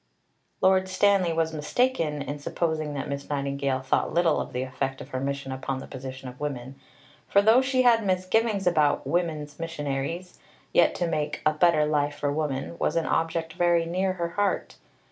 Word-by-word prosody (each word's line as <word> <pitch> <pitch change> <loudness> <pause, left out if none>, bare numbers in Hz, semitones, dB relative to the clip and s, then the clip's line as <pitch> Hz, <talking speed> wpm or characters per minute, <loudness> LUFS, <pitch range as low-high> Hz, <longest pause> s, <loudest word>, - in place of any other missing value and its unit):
Lord 190 0 +4
Stanley 190 -2 +3
was 160 0 0
mistaken 155 - 0
in 145 +1 -5
supposing 155 0 -2
that 140 - -3
Miss 140 0 -5
Nightingale 140 -2 -1
thought 130 - 0
little 170 -2 +2
of - - -6
the 125 +1 -2
effect 135 +1 -3
of - - -9
her 130 - -3
mission 140 0 -3
upon 130 0 -3
the 130 - -7
position 130 0 -8
of 125 0 -10
women; 135 -3 -4 0.5
for, 200 - +4
though 220 +5 +6
she 260 -1 +2
had 230 -2 +5
misgivings 195 +2 +1
about 155 -5 +2
"woman's 155 -4 -2
missionaries," 165 +2 -4 0.3
yet - - +4
to 175 - 0
make 155 -2 -2
"a 155 - +4
better 155 -1 +4
life 145 -1 0
for 145 -1 -1
woman" 150 +1 -3
was - - 0
an 165 -1 +1
object 165 0 -1
very 175 -1 +2
near 185 +3 0
her 170 -2 -3
heart. 205 +3 -1
155 Hz, 180 wpm, -26 LUFS, 140-180 Hz, 0.5 s, though